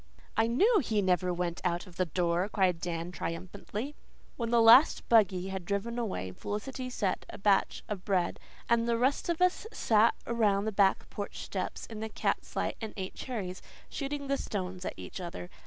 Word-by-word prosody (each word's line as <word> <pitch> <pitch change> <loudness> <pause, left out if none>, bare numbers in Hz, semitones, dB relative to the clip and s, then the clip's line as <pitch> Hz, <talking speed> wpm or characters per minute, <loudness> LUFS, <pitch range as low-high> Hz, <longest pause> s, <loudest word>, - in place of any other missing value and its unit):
"I 225 - +3
KNEW 405 - +4
he 220 -6 0
never 180 -1 +2
went 175 -1 -2
out 175 0 0
of 180 -3 -15
the 185 - +1
door," 175 +3 0
cried 185 -5 +2
Dan 170 0 -3
triumphantly. 200 - -5 0.4
When 235 -2 -2
the 235 0 +4
last 235 +6 +7
buggy 190 -5 +4
had 190 -1 -4
driven 205 +6 -2
away, 95 - -3
Felicity 255 - -5
set 205 -6 -1
a - - -8
batch 200 -1 +2
of 200 -3 -4
bread, 185 -4 0 0.3
and 235 0 +2
the 230 - +2
rest 265 +7 +1
of 340 +1 +2
us 365 +4 +1
sat 225 - +3
around 210 -4 +2
the 220 - 0
back 195 -1 +3
porch 205 - -5
steps - - -4
in 220 -2 -8
the 220 0 -4
cat's - - -2
light - - -1
and 220 -1 -5
ate 190 -1 -4
cherries, 195 -8 -5 0.3
shooting 285 0 -4
the 275 0 0
stones 185 -5 -4
at - - -3
each - - -7
other. 90 - -7
205 Hz, 190 wpm, -30 LUFS, 180-235 Hz, 0.4 s, last